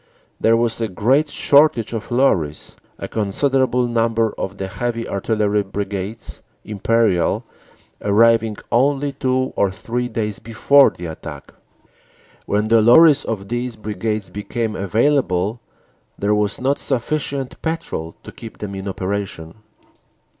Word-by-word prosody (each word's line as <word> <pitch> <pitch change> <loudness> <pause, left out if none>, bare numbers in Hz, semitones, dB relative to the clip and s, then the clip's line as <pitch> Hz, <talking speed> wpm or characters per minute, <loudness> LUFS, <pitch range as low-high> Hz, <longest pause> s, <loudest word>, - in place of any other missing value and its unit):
There 115 +1 +4
was 115 0 -1
a 115 - 0
great 130 - +1
shortage 140 -7 +3
of 110 -2 -5
lorries, 95 - 0 0.2
a - - -6
considerable 125 +4 +1
number 115 -1 +1
of 95 +1 -5
the 95 - -3
heavy 115 +5 -3
Artillery 105 +1 0
Brigades 100 +2 -5 0.2
(Imperial) 105 -3 +1 0.6
arriving 110 +1 +3
only 140 +3 +2
two 130 -1 -1
or 100 - +2
three 120 +6 -3
days 110 -3 -3
before 125 +5 +4
the 90 - -10
attack. 80 -1 -8 0.9
When 105 +1 0
the 115 -1 +5
lorries 145 +6 +6
of 100 -3 -4
these 120 0 -3
brigades 105 0 -4
became 110 +2 -3
available 110 -1 0 0.6
there 100 +1 +1
was 105 -1 0
not 135 +2 0
sufficient 135 +1 -2
petrol 160 - -4
to - - -10
keep 115 - -11
them 100 -2 -6
in 95 0 -6
operation. 95 -3 -4
115 Hz, 125 wpm, -20 LUFS, 100-125 Hz, 0.9 s, lorries